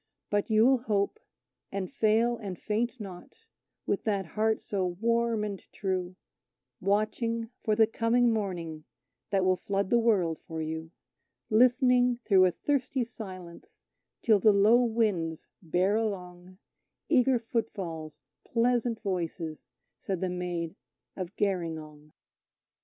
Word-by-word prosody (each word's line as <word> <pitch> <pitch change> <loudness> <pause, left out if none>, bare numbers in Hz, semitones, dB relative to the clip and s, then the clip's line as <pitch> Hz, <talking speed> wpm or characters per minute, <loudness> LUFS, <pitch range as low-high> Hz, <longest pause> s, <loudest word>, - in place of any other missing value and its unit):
But 205 +1 +1
you'll 230 +4 +5
hope, 215 - -1 0.5
and 195 +5 -4
fail 230 0 +3
and 200 -6 -6
faint 230 +5 -2
not, 185 -4 -9 0.5
with 200 - -1
that 200 -3 0
heart 220 +5 0
so 195 -2 -2
warm 230 +4 0
and 200 -2 -3
true, 185 -2 -2 0.6
Watching 225 +3 0
for 215 - +2
the 220 0 +6
coming 230 +2 +2
Morning, 170 -7 -3 0.5
that 195 -2 +2
will 185 0 +3
flood 195 +2 -2
the 240 - +5
World 190 -9 +2
for 160 -1 -7
you; 160 +1 -4 0.6
Listening 250 +1 +4
through 190 -3 +6
a 180 - +3
thirsty 265 - -1
silence, 185 -7 -10 0.4
till 215 -3 +5
the 215 +3 +6
low 215 +5 +5
winds 210 -9 0
bear 185 +4 +1
along 185 -4 -4 0.5
Eager 255 0 +4
footfalls 175 -9 -4 0.2
pleasant 235 -1 +1
voices," 170 -4 -4 0.3
said 190 -3 -3
the 185 - -1
Maid 175 -2 -3 0.4
of 185 0 -6
Gerringong. 160 -6 -3
200 Hz, 125 wpm, -29 LUFS, 180-230 Hz, 0.6 s, the